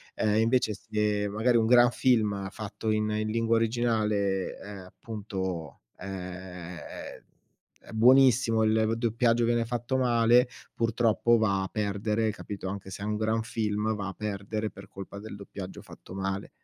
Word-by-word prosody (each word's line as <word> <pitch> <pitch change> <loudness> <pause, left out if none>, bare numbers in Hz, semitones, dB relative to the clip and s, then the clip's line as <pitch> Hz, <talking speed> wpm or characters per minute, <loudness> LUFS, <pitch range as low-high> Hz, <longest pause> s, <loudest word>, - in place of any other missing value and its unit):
Ehm, 110 0 +2
invece 115 -1 +2
se 105 0 -1
magari 115 +4 +2
un 115 - +3
gran 120 +1 +6
film, 105 -7 +1
fatto 110 +1 -4
in 110 0 +1
in 110 0 -1
lingua 115 +1 +1
originale 115 -2 +1
è 95 0 -2 0.2
appunto 95 - -5 0.2
ehm, 90 -2 -7
è - - -9 0.7
buonissimo, 125 -1 +5
il 110 0 +2
doppiaggio, 115 0 +2
viene 120 0 +1
fatto 120 +2 -2
male, 120 0 +4 0.3
purtroppo 115 0 +2
va 100 -3 +1
a 95 - -3
perdere, 105 +2 -1
capito, 100 -2 -7
anche 95 0 -6
se 95 - -7
è - - -3
un 105 0 -1
gran 110 +1 0
film, 110 -1 -1
va 100 -1 -4
a - - -7
perdere 105 +1 -3
per 95 -1 -13
colpa 100 +1 -9
del 110 +1 -8
doppiaggio 100 -2 -8
fatto - - -13
male. 95 0 -3
110 Hz, 150 wpm, -28 LUFS, 100-115 Hz, 0.7 s, gran